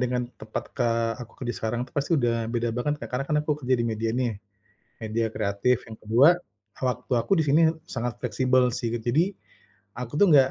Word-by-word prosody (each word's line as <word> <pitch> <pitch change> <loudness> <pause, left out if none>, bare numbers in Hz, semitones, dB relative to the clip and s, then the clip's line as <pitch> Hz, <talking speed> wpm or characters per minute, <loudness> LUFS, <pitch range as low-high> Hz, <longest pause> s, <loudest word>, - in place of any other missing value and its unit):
dengan 125 0 0 0.2
tempat 110 0 -4
ka 115 -1 +1
aku 120 - -9
kerja 120 -1 -2
sekarang, 115 +2 -2
itu - - -19
pasti 145 +3 -2
udah 115 -3 +1
beda 120 -1 -1
banget 145 +5 -1
Kak. - - -6
Karena 125 +2 -2
kan 150 - +2
aku 150 0 0
kerja 130 +1 +3
di - - +1
media 115 0 -1
nih, 125 -3 +1 0.7
media 110 +1 -1
kreatif. 110 +4 +1
Yang 110 - -8
kedua, 120 +8 +6 0.5
waktu 125 0 -2
aku 115 - -3
di - - +2
sini 150 +4 +5 0.3
sangat 120 -1 -4
fleksibel 125 +1 +2
sih. 120 -2 -2
Jadi, 150 - +1 0.6
aku 125 +1 -6
tuh 205 - +7
nggak 135 -3 +6
125 Hz, 195 wpm, -26 LUFS, 115-130 Hz, 0.7 s, tuh